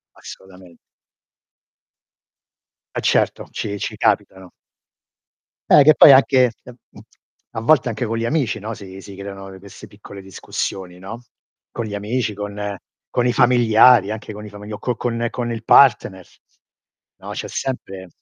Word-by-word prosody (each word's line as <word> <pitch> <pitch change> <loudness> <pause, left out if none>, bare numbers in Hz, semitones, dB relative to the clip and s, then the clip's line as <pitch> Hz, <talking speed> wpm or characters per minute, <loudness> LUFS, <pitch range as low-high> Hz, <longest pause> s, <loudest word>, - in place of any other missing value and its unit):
Assolutamen 90 -2 -14 2.2
Eh - - -2
certo, - - 0
ci 100 0 -5
ci - - -5
capitano. 95 -1 -1 1.2
Eh, 145 - +8
che 155 +2 +6
poi 140 - +8
anche 130 -2 +4
ehm, 125 - -13
mhmm, - - -16 0.5
a 110 - -6
volte 125 -1 +2
anche 115 +2 -4
con 115 +1 -3
gli 115 - -3
amici, 135 -3 -1
no, 110 +2 -6
si 95 -3 -11
si 100 - -12
creano, 100 0 -9
uhm, 95 - -12
queste 100 +1 -13
piccole 100 -1 -13
discussioni, 95 -1 -6
no, 105 +6 -9 0.5
con 115 - -5
gli 105 - -6
amici, 105 +2 -2
con 105 0 -6 0.4
con 125 0 0
i 120 - +2
familiari, 120 -3 +4
anche 110 0 -7
con 105 +1 -10
i - - -9
familia 105 +1 -10
o - - -15
co 125 +2 -3
con 120 -1 -2
con 120 0 -4
il 115 0 -7
partner, 105 -9 +4 0.9
no, - - -11
c'è - - -6
sempre 95 -8 -6
105 Hz, 155 wpm, -20 LUFS, 100-120 Hz, 2.2 s, Eh